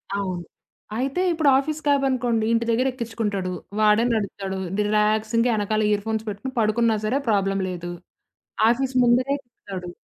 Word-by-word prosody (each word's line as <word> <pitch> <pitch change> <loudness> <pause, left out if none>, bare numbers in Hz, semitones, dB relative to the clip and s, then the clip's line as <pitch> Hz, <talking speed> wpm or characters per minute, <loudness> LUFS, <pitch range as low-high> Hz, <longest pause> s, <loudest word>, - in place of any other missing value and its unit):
అవును. 185 -3 -3 0.5
అయితే 270 +7 -1
ఇప్పుడు 315 -3 +3
ఆఫీస్ 300 +3 -2
క్యాబ్ 280 -1 +3
అనుకోండి. 240 -4 0
ఇంటి 230 0 +1
దగ్గర 240 +3 +2
ఎక్కించుకుంటాడు. 220 -6 -3 0.3
వాడే 215 +1 +4
నడుపుతాడు. 195 -3 -3 0.2
రిలాక్సింగ్‌గా 215 +3 +2
ఎనకాల 215 +1 0
ఇయర్‌ఫోన్స్ 220 +1 -1
పెట్టుకొని 210 +6 -6
పడుకున్నా 225 +1 +2
సరే, 250 +6 +1
ప్రాబ్లమ్ 195 -2 +1
లేదు. 175 -1 -5 0.8
ఆఫీసు 260 +2 0
ముందరే 250 +3 +3
దింపుతాడు. 195 -7 -9
220 Hz, 130 wpm, -23 LUFS, 205-245 Hz, 0.8 s, వాడే